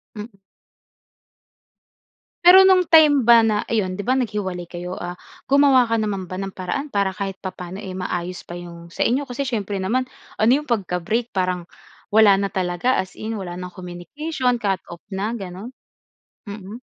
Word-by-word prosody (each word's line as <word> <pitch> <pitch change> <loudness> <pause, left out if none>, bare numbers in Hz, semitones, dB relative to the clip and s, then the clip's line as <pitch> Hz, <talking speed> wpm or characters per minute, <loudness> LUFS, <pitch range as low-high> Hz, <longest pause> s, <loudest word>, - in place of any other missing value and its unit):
Mm. 210 -1 -9 2.1
Pero, 360 +1 +10
no'ng 375 -1 +6
time 305 -3 +7
ba 235 -1 +9
na 220 -2 +2
iyon,'di 205 -3 -1
ba, 255 - +2
naghiwalay 200 -8 -3
kayo? 180 +1 -6
Ah, 175 0 -6 0.3
gumawa 275 -4 +5
ka 230 - +2
naman 200 -4 -3
ba 185 - -5
ng 195 0 -5
paraan 185 +11 -4
para 200 -1 +2
kahit 195 -1 -4
papaano, 185 0 -7
eh, 190 -3 -7
maayos 180 0 -4
pa - - -8
'yong 170 -1 -11
sa - - -5
inyo? 265 +5 +1
Kasi 250 0 -5
siyempre 205 -5 -2
naman 250 +7 0 0.3
ano 220 +2 +4
'yong 300 - -15
pagka-break, 215 +2 -1
parang 180 -2 -1 0.5
wala 210 -2 +6
na 200 - 0
talaga 185 +7 0
as 185 0 -11
in, 220 +1 -4
wala 180 -3 -6
ng 180 0 -7
communication, 250 - -3
cut-off 190 -4 -3
na 205 +4 -2
gano'n? 195 +2 -7 0.8
Mm. 205 +2 -8
200 Hz, 160 wpm, -22 LUFS, 180-235 Hz, 2.1 s, Pero